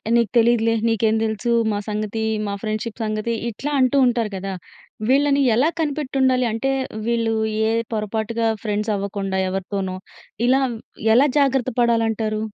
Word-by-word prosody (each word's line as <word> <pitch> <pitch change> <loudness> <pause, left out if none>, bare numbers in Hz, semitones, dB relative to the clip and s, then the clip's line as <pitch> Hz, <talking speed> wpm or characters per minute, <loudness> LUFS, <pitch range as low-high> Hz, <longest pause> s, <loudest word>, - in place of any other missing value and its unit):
"నీకు 235 -2 +3
తెలీదులే. 230 -1 +3
నీకేం 225 0 +2
దెలుసు 220 +2 -1 0.2
మా 205 - -1
సంగతి. 215 +1 -2 0.2
మా 200 - -2
ఫ్రెండ్షిప్ 215 +2 -3
సంగతి". 215 +2 -2 0.2
ఇట్లా 280 +7 -5
అంటూ 260 +2 +3
ఉంటారు 235 -3 0
గదా! 195 +1 -4 0.6
వీళ్ళని 280 +1 +3
ఎలా 270 +7 +3
కనిపెట్టుండాలి? 265 -4 +1
అంటే 230 +5 -1 0.4
వీళ్ళు 230 -1 +1 0.4
ఏ - - +1 0.2
పొరపాటుగా 220 +2 -1 0.2
ఫ్రెండ్స్ 210 0 -1
అవ్వకుండా 195 -1 -3
ఎవరితోనో 190 0 -3 0.5
ఇలా 265 +2 +4 0.5
ఎలా 270 +4 +6
జాగ్రత్త 270 -2 +2
పడాలంటారు? 225 -2 +1
225 Hz, 130 wpm, -21 LUFS, 215-250 Hz, 0.6 s, ఎలా